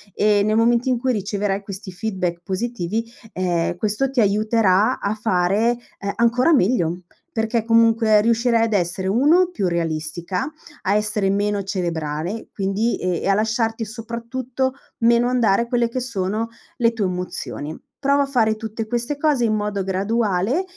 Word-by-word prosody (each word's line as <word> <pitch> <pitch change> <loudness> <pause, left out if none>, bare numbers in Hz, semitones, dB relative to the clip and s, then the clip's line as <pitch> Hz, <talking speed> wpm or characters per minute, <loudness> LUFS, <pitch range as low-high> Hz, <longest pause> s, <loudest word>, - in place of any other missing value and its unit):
e 210 -1 +3
nel 215 +1 +1
momento 235 +3 +3
in 250 - +2
cui 255 +1 0
riceverai 200 -1 -1
questi 195 -1 -8
feedback 185 -3 -3
positivi, 220 +1 -2 0.3
ehm, 175 -2 0
questo 215 +7 0
ti 260 -2 +1
aiuterà 215 +1 +3
a 200 - -1
fare, 215 +2 +1 0.2
ehm, 200 0 -3
ancora 235 +6 +3
meglio, 180 - +2 0.3
perché 225 0 0
comunque 225 -1 +4
riuscirai 230 +1 +2
ad 225 -1 0
essere: 185 0 0
1, 300 - +4
più 200 - -1
realistica, 170 - -2 0.3
a 195 - +1
essere 210 -2 +1
meno 205 +1 0
cerebrale, 175 0 -3
quindi, 200 +4 -1
ehm, 180 -2 -1
e - - -1
a 195 - +4
lasciarti, 225 +1 0
soprattutto, 235 +3 -3 0.3
meno 235 +1 +4
andare 235 -3 +2
quelle 235 -1 +1
che 255 +2 -3
sono 220 -2 -2 0.3
le 235 -2 +3
tue 220 -3 -1
emozioni. 180 -4 -4 0.2
Prova 280 0 +3
a - - -1
fare 225 -5 +2
tutte 220 0 -5
queste 240 +5 -2
cose, 290 -4 +2
in 220 - +1
modo 205 -2 -2
graduale, 200 - 0
215 Hz, 155 wpm, -21 LUFS, 195-235 Hz, 0.3 s, comunque